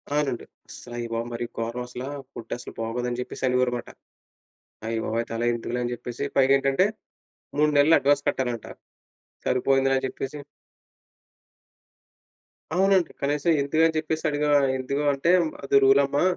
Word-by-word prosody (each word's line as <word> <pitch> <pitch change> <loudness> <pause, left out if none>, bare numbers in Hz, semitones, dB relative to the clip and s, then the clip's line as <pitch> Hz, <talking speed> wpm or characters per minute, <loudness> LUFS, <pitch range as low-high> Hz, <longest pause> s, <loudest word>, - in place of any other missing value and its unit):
ఆనండి. 145 -5 -1 0.2
"అసలు 120 - -10
అయ్యా 120 -1 -4
బాబో! 115 0 -1
మరి 120 +1 -3
గోరం 115 +2 -3
అసలా, 125 +1 -6 0.3
ఫుడ్ - - -7
అస్సలు 120 - -9
బాగోదు" 115 +2 -2
అని 120 0 -4
చెప్పేసి 125 - -7
అనేవారనమాట. 125 -1 0 1.0
"అయ్య 115 0 -2
బాబోయ్! 115 +1 0
అయితలా 115 0 -3
ఎందుకులే" 120 +1 -3
అని 120 - -2
చెప్పేసి 120 +2 -6
పైగా 135 0 +5
ఏంటంటే, 135 +7 +2 0.7
3 150 0 +4
నెలలు 150 +3 +6
అడ్వాన్స్ 145 0 +2
కట్టాలంట, 120 -4 -2 0.8
"సరిపోయిందిలే" 135 +1 +2
అని 130 - -2
చెప్పేసి 135 +3 -6 2.4
అవునండి. 190 -1 +3
కనీసం 145 +3 0
ఎందుకని 160 +3 +2
చెప్పేసి 160 0 -2
అడిగా, 150 0 0 0.3
ఎందుకు 140 +3 -2
అంటే 140 +5 +1 0.3
అది 140 - +4
రూల్ 135 +1 +6
అమ్మా 140 +3 0
135 Hz, 140 wpm, -25 LUFS, 120-145 Hz, 2.4 s, నెలలు